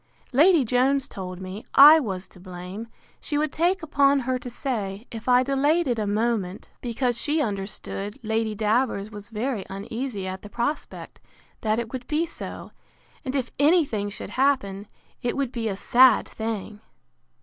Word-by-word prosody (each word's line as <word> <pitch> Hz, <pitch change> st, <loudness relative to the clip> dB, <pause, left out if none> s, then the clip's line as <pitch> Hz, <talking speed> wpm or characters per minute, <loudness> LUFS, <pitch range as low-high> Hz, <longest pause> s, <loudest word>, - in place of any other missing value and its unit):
Lady 310 Hz, +1 st, +5 dB
Jones 260 Hz, +4 st, +2 dB
told 185 Hz, -5 st, -7 dB
me, 190 Hz, +3 st, -7 dB
I 300 Hz, +3 st, +10 dB
was 195 Hz, -9 st, -4 dB
to 185 Hz, -, -16 dB
blame, 180 Hz, +4 st, -8 dB, 0.3 s
she 295 Hz, -, -2 dB
would 300 Hz, 0 st, 0 dB
take 350 Hz, +2 st, +1 dB
upon 280 Hz, -2 st, +3 dB
her 255 Hz, 0 st, -1 dB
to 245 Hz, -, -7 dB
say, 220 Hz, -5 st, -4 dB
if 225 Hz, +2 st, -5 dB
I 250 Hz, 0 st, +6 dB
delayed 285 Hz, +5 st, +2 dB
it 240 Hz, -3 st, 0 dB
a 210 Hz, -, -1 dB
moment; 210 Hz, -3 st, -1 dB
because 240 Hz, 0 st, -1 dB
she 305 Hz, +2 st, +1 dB
understood 200 Hz, -2 st, -4 dB
Lady 220 Hz, 0 st, -1 dB
Davers 215 Hz, -1 st, 0 dB
was 205 Hz, 0 st, -9 dB
very 225 Hz, -1 st, -2 dB
uneasy 215 Hz, +2 st, -5 dB
at 185 Hz, 0 st, -5 dB
the 205 Hz, -, -10 dB
prospect, 240 Hz, +7 st, -4 dB, 0.4 s
that 215 Hz, 0 st, +1 dB
it 230 Hz, 0 st, -4 dB
would 255 Hz, -1 st, -5 dB
be 310 Hz, +3 st, +1 dB
so; 335 Hz, -, -8 dB, 0.5 s
and 265 Hz, -1 st, -4 dB
if 260 Hz, -3 st, -1 dB
any 315 Hz, +3 st, +5 dB
thing 205 Hz, -5 st, -3 dB
should 205 Hz, -, -7 dB
happen, 210 Hz, -8 st, 0 dB, 0.3 s
it 240 Hz, -, -2 dB
would 275 Hz, -3 st, -1 dB
be 235 Hz, -3 st, -3 dB
a 200 Hz, -, -2 dB
sad 250 Hz, +6 st, +5 dB
thing! 220 Hz, -1 st, -5 dB
235 Hz, 170 wpm, -25 LUFS, 205-275 Hz, 0.5 s, I